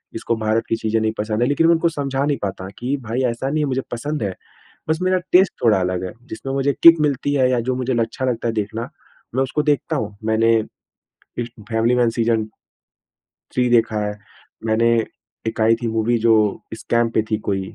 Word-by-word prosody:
इसको 115 +1 -1
भारत 110 +1 0
की - - +2
चीज़ें 110 0 0
नहीं 110 0 +1
पसंद 110 +1 -2
हैं। 120 - +3
लेकिन 165 +3 +3
मैं 170 - +6
उनको 170 +1 +2
समझा 140 -3 -2
नहीं 145 -1 0
पाता 95 -1 -4
कि 125 +4 -1
भाई 115 +4 -2
ऐसा 130 +3 -3
नहीं 155 +2 0
है - - +2
कि - - -3
मुझे 130 0 -1
पसंद 145 +3 -3
है। 95 -2 -3 0.5
बस 160 0 +1
मेरा 185 0 +2
टेस्ट 185 +1 +5
थोड़ा 105 -4 +4
अलग 90 0 -1
है, 90 - -5 0.2
जिसमें 135 +5 -6
मुझे 135 +1 +1
किक 165 -1 +9
मिलती 145 -1 0
है 130 -2 +3
या 125 -2 +2
जो 125 +2 -1
मुझे 130 0 -1
अच्छा 115 +3 -2
लगता 120 -2 -1
है 115 - -1
देखना, 110 +2 -3 0.5
मैं 130 - +2
उसको 140 +3 -1
देखता 145 -4 0
हूँ। 105 -2 -4
मैंने 115 +1 +3 0.8
इस 120 -1 -2 0.2
फैमिली 115 +1 +2
मैन 120 -2 +3
सीज़न 115 -1 +1 1.1
थ्री 125 -1 +2
देखा 115 -2 +3
है। 105 0 -5 0.5
मैंने 115 +1 +3 0.5
एक 110 0 -2
आई 115 +1 +5
थी 120 - -1
मूवी 115 +1 +1
जो 115 0 +4 0.4
स्कैम 115 +1 0
पे 110 - +4
थी 110 - +2
कोई 95 -1 0
115 Hz, 210 wpm, -21 LUFS, 110-135 Hz, 1.1 s, किक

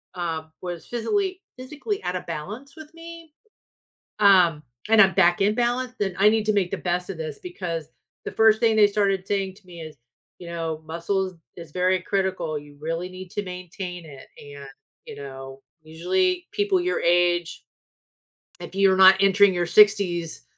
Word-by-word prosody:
um, 160 -2 -4
was 175 -2 -7
physically- 375 - -1 0.2
physically 300 - -5
out 180 - -3
of 180 - -5
balance 210 - -7
with 315 0 -13
me, 335 -1 -12 0.9
um, 180 -7 +5 0.3
and 220 -1 +7
I'm 190 -1 +5
back 175 -2 +3
in 205 +2 +3
balance, 245 +1 -1
then 195 -3 -2
I 210 - +6
need 220 0 0
to 215 - +3
make 190 -3 0
the - - -2
best 180 +1 -3
of 175 - -9
this 155 -3 -6
because 170 -3 -5 0.4
the - - -4
first 220 -1 +4
thing 225 -1 +2
they 210 -1 +6
started 195 -2 0
saying 195 -2 -2
to 200 -1 -22
me 170 -2 -11
is, 155 -1 -9 0.4
you 175 - -9
know, 165 -2 -4
muscles 185 +3 -2 0.2
is 165 -3 -11
very 185 +2 +1
critical. 185 -5 -2
You 145 0 -12
really 165 +3 -3
need 185 0 -10
to 205 - -3
maintain 180 -1 -8
it. 140 -3 -12 0.2
And, 145 -1 -11 0.4
you - - -9
know, 135 -1 -9 0.2
usually 355 - -1
people 410 -3 +1
your 365 +1 -1
age, 175 0 +1 1.0
if - - -10
you're 195 -1 +4
not 190 0 +8
entering 195 0 +4
your 175 0 0
60s, 180 -4 +3
185 Hz, 170 wpm, -24 LUFS, 170-215 Hz, 1.0 s, not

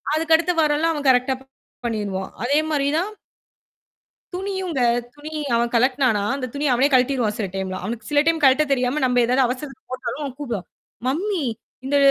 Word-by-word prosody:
அதுக்கடுத்து 325 +2 +3
வாரமெல்லாம் 310 +2 +2
அவன் 290 -2 -2
கரெக்ட்டா 255 +1 +3 0.5
பண்ணிருவான். 205 -4 -3
அதே 285 +4 +3
மாரி 280 -2 +1
தான் 400 +4 -2 1.2
துணியுங்க. 375 -6 -3 0.3
துணி 295 +1 -9 0.3
அவன் 235 0 +1
கழட்டினானா 250 -3 +3
அந்த 255 -2 -3
துணி 290 +1 -1
அவனே 260 +4 +4
கழட்டிருவான் 250 -4 +2
சில 205 - -1
டைம்லாம். 190 -1 -3
அவனுக்கு 225 +1 -5
சில 290 0 +4
டைம் 330 0 +2
கழட்ட 270 +3 +5
தெரியாம, 255 +3 +1
நம்ம 250 -1 +3
ஏதாவது 255 +2 +3
அவசரத்த 260 +1 -5
போட்டாலும், 255 +3 -4
அவன் 270 -3 -4
கூப்படுவான். 235 -10 -4 0.4
"மம்மி 350 +2 -1 0.4
இந்த 285 +2 +1
270 Hz, 155 wpm, -22 LUFS, 245-300 Hz, 1.2 s, கழட்ட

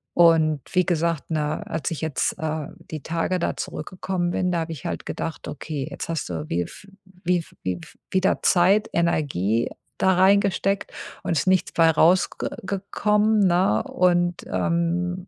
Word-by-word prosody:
Und 160 -3 +5
wie 180 -1 +3
gesagt, 165 -3 0
ne, 150 -1 -1
als 160 -3 -2
ich 165 - -4
jetzt, 160 -3 -1
äh, 155 -1 -2 0.2
die 155 -2 -5
Tage 170 +3 -1
da - - -1
zurückgekommen 180 +1 -3
bin, 180 +1 0
da 175 - 0
habe 165 0 -4
ich 145 - -10
halt - - -4
gedacht: 165 - -5
„Okay, 145 -1 -5
jetzt - - -6
hast 165 -3 -2
du 80 -3 -5
wie 85 +1 0
v 195 - -13 0.4
wie 180 0 +2
v - - -20
wie 90 -1 -2
v - - -14 0.2
wieder 190 0 +2
Zeit, 195 +4 +4
Energie 135 - +1 0.3
da 190 0 +4
reingesteckt 195 +1 +2 0.3
und - - -2
es 150 - +2
ist - - -7
nichts 185 -1 +3
bei 165 -1 +5
rausge 170 +4 +4
ge - - -2 0.2
gekommen, 210 +2 +1
ne? 175 - +2
Und, 175 -1 +1
ähm, 175 +2 -1
170 Hz, 175 wpm, -24 LUFS, 155-185 Hz, 0.4 s, Und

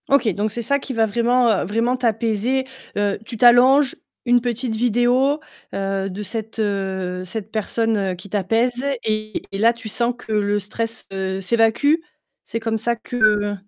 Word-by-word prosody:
OK, 275 -3 +4
donc 205 +2 -1
c'est 235 - -3
ça 280 +5 +1
qui 265 - -6
va 225 -2 +3
vraiment, 235 -1 +2
heu, - - -2
vraiment 230 +6 0
t'apaiser. 235 +1 0 0.3
Heu, 205 -1 0
tu 230 0 -7
t'allonges, 255 +4 +6 0.3
une 245 0 +4
petite 240 -1 -2
vidéo, 245 +5 +2 0.3
heu, 195 0 -2
de 195 +3 -6
cette, 220 +2 -5
heu, 190 -3 -2
cette 210 +3 -6
personne 215 -3 0
qui 185 +3 -11
t'apaise 225 +6 0 0.2
et 215 -1 -2
et 195 - -4
là, 230 +3 +4
tu 230 -1 -8
sens 235 +3 +1
que 225 - -10
le 205 -1 +1
stress, 225 +3 -4
heu, 190 0 -2
s'évacue? 225 +9 +3 0.5
C'est 230 - -4
comme 225 0 -1
ça 235 +2 0
que 215 -3 +1
225 Hz, 165 wpm, -21 LUFS, 205-240 Hz, 0.5 s, t'allonges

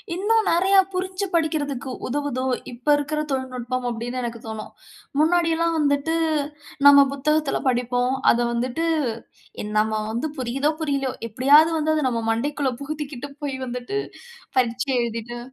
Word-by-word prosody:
இன்னும் 435 +3 +2
நிறையா 380 +3 +4
புரிஞ்சு 375 +2 -2
படிக்கிறதுக்கு 290 -6 -1 0.2
உதவுதோ, 270 -1 -2 0.3
இப்போ 245 +5 0
இருக்கிற 300 +1 -2
தொழில்நுட்பம் 255 -1 -3
அப்படின்னு 240 +2 -4
எனக்கு 235 -1 -4
தோணும். 220 -1 -6 0.5
முன்னாடியெல்லாம் 335 0 +2
வந்துட்டு 285 +2 +1 0.7
நம்ம 280 -1 +9
புத்தகத்துல 300 +1 +1
படிப்போம். 245 +1 0 0.2
அத 235 - +1
வந்துட்டு 255 +7 -1 0.8
என் 210 0 -5
நாம்ம 215 0 +1
வந்து 240 +8 -2
புரியுதோ, 265 +4 0
புரியலையோ 275 -4 -1 0.2
எப்படியாவது 285 +8 +5
வந்து 310 +1 +1
அத 305 -3 0
நம்ம 230 -2 -2
மண்டைக்குள்ள 275 +4 -1
புகுத்திக்கிட்டு 290 -2 -5
போய் 275 -2 -2
வந்துட்டு 250 +11 -3 0.6
பரீட்சை 250 +2 +1
எழுதிட்டு 235 +1 -4
275 Hz, 130 wpm, -23 LUFS, 245-310 Hz, 0.8 s, நம்ம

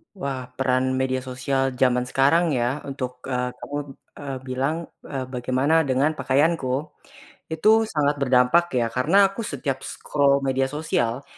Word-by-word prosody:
Wah, 140 -7 -4 0.2
peran 130 0 +1
media 130 0 0
sosial 130 +1 -2
zaman 125 -1 +3
sekarang 145 +6 +3
ya 125 +4 0
untuk, 130 -2 -5
eee, 125 -1 -1
kamu, 145 - -7 0.4
eee, 140 -2 -5
bilang, 130 +4 -1 0.3
eee, 135 -2 -4
bagaimana 130 +6 +2
dengan 140 +4 +2
pakaianku. 140 +1 +1 0.6
Itu 160 +6 +2 0.2
sangat 145 -1 +2
berdampak 130 +5 +4
ya 120 -2 +1
karena 165 - +4
aku 195 +4 -6
setiap 140 - -3
scroll 140 -1 +1
media 135 0 +1
sosial, 135 -4 -1
135 Hz, 135 wpm, -23 LUFS, 130-145 Hz, 0.6 s, berdampak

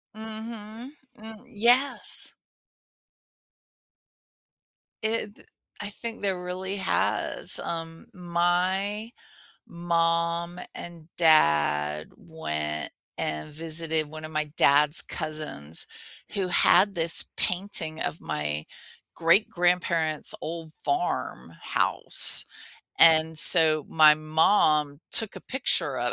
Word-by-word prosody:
Mhm, 220 +2 -9 0.3
mm 220 0 -11
yes. 245 +6 +1 2.7
It 220 -1 -3
th - - -22 0.3
I 205 -1 -5
think 230 +2 -8
there 190 -3 -3
really 190 +2 -5
has, 190 0 +1
um, 165 -1 -7
my 185 +4 -2 0.6
mom 170 0 -2
and 170 -2 -11
dad 75 - +2
went 75 - -6 0.3
and 75 - -5
visited 160 -1 -2
one 155 +1 -10
of - - -12
my 155 -1 -3
dad's 145 +2 +4
cousins, 155 - -4 0.5
who 190 -3 -2
had 200 +3 +3
this 165 0 +4
painting 175 -4 0
of 155 - -5
my 75 0 -4 0.5
great 170 +6 +2
grandparents' 170 -3 0
old 160 0 -7
farm 360 - -3
house, - - +4 0.5
and 160 -1 +4
so, 155 -3 +4
my 155 -1 +5
mom 155 -2 +1
took 225 -3 +5
a - - -9
picture 170 - -1
of 120 0 -2
165 Hz, 95 wpm, -25 LUFS, 155-195 Hz, 2.7 s, my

